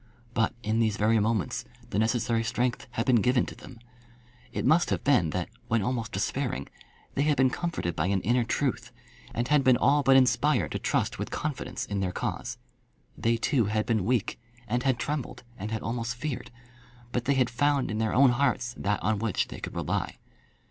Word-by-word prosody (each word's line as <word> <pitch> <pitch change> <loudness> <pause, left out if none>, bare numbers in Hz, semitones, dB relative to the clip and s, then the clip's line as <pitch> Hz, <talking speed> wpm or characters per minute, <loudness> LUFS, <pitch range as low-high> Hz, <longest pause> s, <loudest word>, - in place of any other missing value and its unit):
But 115 -2 +1
in 110 +2 0
these 110 -2 +1
very 110 +1 +3
moments 110 -1 0 0.3
the 100 - +1
necessary 115 0 +1
strength 120 +2 -1
had 115 - -1
been 125 -4 +4
given 125 +2 +3
to - - -8
them. 125 - -12 0.7
It - - -3
must 170 +2 +4
have - - -1
been 125 - +3
that, - - -2 0.2
when 115 -2 +1
almost 115 -1 -2
despairing, 70 +1 -2 0.4
they - - 0
had 145 -1 +2
been 130 0 +4
comforted 160 - -2
by 75 +3 0
an 95 -1 +1
inner 120 +3 +2
truth, 130 +3 -1 0.4
and 120 +1 -2
had 150 -2 +4
been 130 -2 +5
all 145 +4 +4
but 135 -1 +6
inspired 130 -1 +3
to - - -2
trust - - -1
with - - -3
confidence 150 -4 -3
in 100 -1 -3
their 95 -2 -1
cause. - - -4 0.6
They, 115 0 +1
too, 120 0 +2
had 110 +1 0
been 110 -5 +1
weak, 115 0 0 0.3
and 120 +3 0
had 130 -2 +1
trembled, 145 -1 -4
and 105 0 -5
had 110 0 -3
almost 115 +1 -2
feared. 135 +1 -4 0.6
But 125 0 -2
they 140 - +2
had 125 -2 +2
found 140 +1 +1
in 110 - -2
their 110 -1 0
own 135 -1 +6
hearts 125 -1 0
that 100 -1 -1
on 105 +2 +1
which 110 -2 0
they - - -7
could - - -7
rely. - - -2
120 Hz, 195 wpm, -28 LUFS, 110-130 Hz, 0.7 s, but